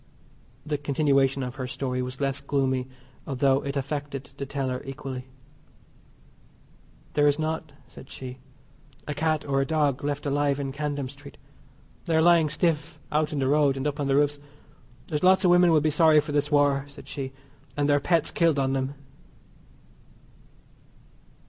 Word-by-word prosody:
The 150 Hz, -2 st, -2 dB
continuation 140 Hz, -2 st, +2 dB
of 125 Hz, +1 st, -6 dB
her 130 Hz, -2 st, -3 dB
story 125 Hz, -1 st, -3 dB
was 125 Hz, 0 st, -5 dB
less 135 Hz, -1 st, -1 dB
gloomy 130 Hz, -2 st, 0 dB, 0.4 s
although 135 Hz, 0 st, +2 dB
it 140 Hz, 0 st, -4 dB
affected 140 Hz, 0 st, -4 dB
the 140 Hz, -, -5 dB
teller 130 Hz, -2 st, -2 dB
equally. 135 Hz, -2 st, -7 dB, 1.9 s
"There 145 Hz, 0 st, +4 dB
is 145 Hz, 0 st, +3 dB
not," 160 Hz, 0 st, -3 dB, 0.2 s
said 130 Hz, +2 st, -13 dB
she, 130 Hz, 0 st, -8 dB, 0.7 s
"a 150 Hz, -, -2 dB
cat 155 Hz, +1 st, 0 dB
or 135 Hz, -1 st, +1 dB
a -, -, +2 dB
dog 145 Hz, -4 st, +1 dB
left 145 Hz, 0 st, -2 dB
alive 145 Hz, 0 st, +1 dB
in 135 Hz, -1 st, -3 dB
Camden 145 Hz, -1 st, -3 dB
Street. 140 Hz, +1 st, -13 dB, 0.7 s
They 165 Hz, -, 0 dB
are 160 Hz, -, +4 dB
lying 170 Hz, -2 st, +5 dB
stiff 155 Hz, 0 st, 0 dB
out 150 Hz, 0 st, +1 dB
in 150 Hz, -, -3 dB
the 135 Hz, -1 st, +1 dB
road 145 Hz, -1 st, +3 dB
and 135 Hz, -, -3 dB
up 145 Hz, 0 st, -2 dB
on 140 Hz, -, -1 dB
the 135 Hz, -, +2 dB
roofs. 145 Hz, 0 st, +2 dB, 0.7 s
There's 150 Hz, -3 st, -3 dB
lots 190 Hz, +1 st, +5 dB
of 180 Hz, -, +5 dB
women 175 Hz, -1 st, +6 dB
will 155 Hz, -2 st, +4 dB
be 155 Hz, +1 st, +1 dB
sorry 155 Hz, 0 st, +5 dB
for 150 Hz, +1 st, -3 dB
this 145 Hz, 0 st, +1 dB
war," 145 Hz, -2 st, +3 dB
said 145 Hz, +1 st, -13 dB
she, 135 Hz, -2 st, -5 dB, 0.5 s
"and 145 Hz, 0 st, +1 dB
their 145 Hz, 0 st, +4 dB
pets 165 Hz, +2 st, +1 dB
killed 165 Hz, -3 st, +2 dB
on 135 Hz, -1 st, +1 dB
them." 135 Hz, +1 st, -2 dB
145 Hz, 170 wpm, -26 LUFS, 135-150 Hz, 1.9 s, women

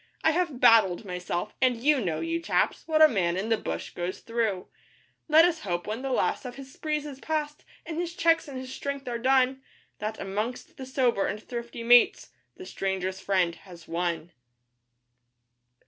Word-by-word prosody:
I 320 Hz, -, +5 dB
have 330 Hz, -6 st, -1 dB
'battled' 215 Hz, -5 st, +5 dB
myself, 180 Hz, +2 st, -4 dB
and 255 Hz, -2 st, +3 dB
you 285 Hz, +2 st, +3 dB
know, 165 Hz, -4 st, -2 dB
you 335 Hz, 0 st, -2 dB
chaps, -, -, 0 dB
what 315 Hz, -1 st, +5 dB
a -, -, +10 dB
man 180 Hz, -, 0 dB
in 205 Hz, +4 st, -2 dB
the 225 Hz, -, +4 dB
bush -, -, -5 dB
goes 175 Hz, +1 st, -4 dB
through; 225 Hz, -5 st, -2 dB, 0.6 s
Let 320 Hz, +1 st, +7 dB
us 340 Hz, -2 st, 0 dB
hope 175 Hz, -, -3 dB
when 220 Hz, +4 st, -4 dB
the 270 Hz, -, -3 dB
last 255 Hz, -, 0 dB
of 250 Hz, -2 st, -7 dB
his 270 Hz, -1 st, -11 dB
sprees 300 Hz, -1 st, -2 dB
is 280 Hz, -3 st, -8 dB
past, 300 Hz, 0 st, -3 dB, 0.2 s
and 325 Hz, -1 st, -4 dB
his 345 Hz, 0 st, -3 dB
cheques 330 Hz, -4 st, +3 dB
and 275 Hz, -2 st, -7 dB
his 260 Hz, 0 st, -7 dB
strength 280 Hz, -1 st, -5 dB
are 235 Hz, -1 st, -3 dB
done, 260 Hz, +1 st, +2 dB, 0.4 s
That, 215 Hz, +1 st, -4 dB
amongst 210 Hz, +6 st, -4 dB
the 265 Hz, -, -7 dB
sober 250 Hz, -6 st, +1 dB
and 210 Hz, -, -3 dB
thrifty 235 Hz, 0 st, -7 dB
mates, 240 Hz, +1 st, +5 dB, 0.3 s
the 370 Hz, -, -9 dB
Stranger's 190 Hz, -, -3 dB
Friend 185 Hz, -4 st, +1 dB
has 170 Hz, -2 st, -14 dB
one. 170 Hz, 0 st, -2 dB
245 Hz, 180 wpm, -27 LUFS, 195-290 Hz, 0.6 s, a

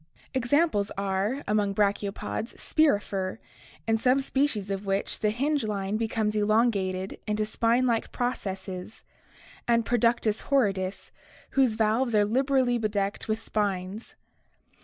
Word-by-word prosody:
Examples 260 Hz, -4 st, +2 dB
are, 200 Hz, +7 st, -1 dB
among 205 Hz, -2 st, +1 dB
brachiopods, 205 Hz, +2 st, -1 dB
Spirifer, 205 Hz, -10 st, +1 dB, 0.5 s
in 225 Hz, 0 st, +3 dB
some 255 Hz, +3 st, +3 dB
species 265 Hz, -7 st, 0 dB
of 195 Hz, 0 st, -3 dB
which 195 Hz, +1 st, -1 dB
the 215 Hz, -, +2 dB
hinge 275 Hz, +5 st, 0 dB
line 205 Hz, -1 st, -2 dB
becomes 220 Hz, -1 st, -1 dB
elongated 205 Hz, -3 st, +1 dB
into 210 Hz, 0 st, 0 dB
spine 230 Hz, +3 st, +2 dB
like 235 Hz, -2 st, 0 dB
processes, 195 Hz, -5 st, -4 dB, 0.6 s
and 235 Hz, -1 st, +3 dB
Produdus 230 Hz, -2 st, +2 dB
horridus, 195 Hz, -8 st, 0 dB, 0.4 s
whose 260 Hz, -5 st, +3 dB
valves 225 Hz, +2 st, +1 dB
are 205 Hz, -1 st, +5 dB
liberally 255 Hz, +1 st, +2 dB
bedecked 205 Hz, -2 st, -2 dB
with 220 Hz, +1 st, -2 dB
spines. 200 Hz, 0 st, -3 dB
215 Hz, 115 wpm, -27 LUFS, 200-245 Hz, 0.6 s, are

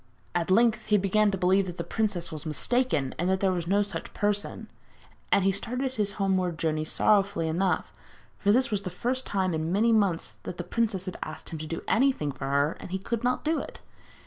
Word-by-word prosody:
At 175 Hz, 0 st, -1 dB
length 225 Hz, +3 st, +3 dB
he 210 Hz, -1 st, +4 dB
began 205 Hz, +2 st, +3 dB
to 195 Hz, -, -1 dB
believe 190 Hz, +2 st, +3 dB
that 175 Hz, 0 st, -6 dB
the 170 Hz, -, -2 dB
princess 195 Hz, -1 st, -2 dB
was 155 Hz, -2 st, -6 dB
mistaken, 155 Hz, -, +1 dB
and 175 Hz, +2 st, +1 dB
that 190 Hz, 0 st, +2 dB
there 195 Hz, -1 st, +2 dB
was 175 Hz, -2 st, -2 dB
no 200 Hz, +3 st, +3 dB
such 205 Hz, -, -7 dB
person; 205 Hz, 0 st, -1 dB, 0.6 s
and 200 Hz, -, +4 dB
he 195 Hz, -, +4 dB
started 250 Hz, +7 st, -2 dB
on -, -, -13 dB
his 205 Hz, -2 st, 0 dB
homeward 185 Hz, -4 st, 0 dB
journey 155 Hz, -1 st, -1 dB
sorrowfully 200 Hz, -1 st, +2 dB
enough, 180 Hz, +4 st, 0 dB, 0.5 s
for 205 Hz, -, +3 dB
this 255 Hz, +2 st, +3 dB
was 205 Hz, -2 st, 0 dB
the 185 Hz, -, -4 dB
first 250 Hz, +8 st, -2 dB
time 190 Hz, -2 st, 0 dB
for 160 Hz, -, -1 dB
many 195 Hz, +9 st, +2 dB
months 200 Hz, -7 st, +1 dB
that 175 Hz, -, -7 dB
the -, -, -3 dB
princess 215 Hz, -5 st, -1 dB
had 185 Hz, -, -6 dB
asked 155 Hz, -, -6 dB
him 160 Hz, -, -6 dB
to 155 Hz, -, -5 dB
do 165 Hz, -, -5 dB
anything 225 Hz, -, +2 dB
for 135 Hz, 0 st, -7 dB
her 140 Hz, +3 st, +1 dB
and -, -, -9 dB
he 190 Hz, -, -1 dB
could 225 Hz, +5 st, -3 dB
not 250 Hz, +1 st, 0 dB
do 320 Hz, +1 st, +2 dB
it. -, -, -7 dB
195 Hz, 225 wpm, -27 LUFS, 170-215 Hz, 0.6 s, he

